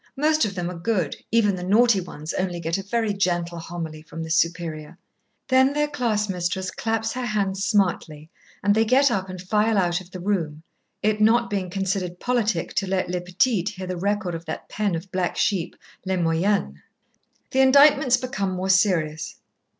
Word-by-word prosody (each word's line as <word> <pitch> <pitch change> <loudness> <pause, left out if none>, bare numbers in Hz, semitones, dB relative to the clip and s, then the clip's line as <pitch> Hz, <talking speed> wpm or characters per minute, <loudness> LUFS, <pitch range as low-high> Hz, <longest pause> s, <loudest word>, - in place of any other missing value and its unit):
Most 310 -1 +3
of 200 -2 -4
them 175 -2 -2
are 175 - -8
good, 180 -5 -1 0.2
even 215 -4 +3
the 180 - -6
naughty 210 +2 +4
ones 155 -2 -7
only 180 -2 -2
get 165 +2 -1
a - - -3
very 220 +1 -1
gentle 175 -3 -1
homily 165 -2 -6
from 165 +1 -8
the 160 - -6
Superior. 165 -1 -1 0.5
Then 260 +1 +4
their 295 0 +1
class 235 -7 -1
mistress 180 0 -2
claps 225 0 -2
her 255 0 -3
hands 195 -3 -1
smartly 165 -7 0 0.3
and 205 +1 +4
they 220 +2 +3
get 260 +4 +4
up 190 -3 -2
and 185 0 -7
file 210 +4 +1
out 175 -1 +1
of 180 - -15
the 185 - -8
room, 165 -5 -2 0.4
it 215 0 +1
not 235 +2 +3
being 190 -3 -2
considered 185 -1 -2
politic 240 -3 0
to 195 - +1
let 185 -1 -1
les 180 - -1
petites 185 +2 0
hear 190 -2 -7
the 185 0 -4
record 195 0 -1
of 165 0 -6
that 160 - -6
pen 205 -4 -1
of 170 +4 -7
black 185 -1 -1
sheep, 180 -4 0 0.3
les 190 0 -1
moyennes. 165 - 0 0.7
The 265 - +1
indictments 275 -1 +6
become 210 -7 -3
more 185 +1 -3
serious. 165 -6 +1
190 Hz, 185 wpm, -24 LUFS, 175-215 Hz, 0.7 s, indictments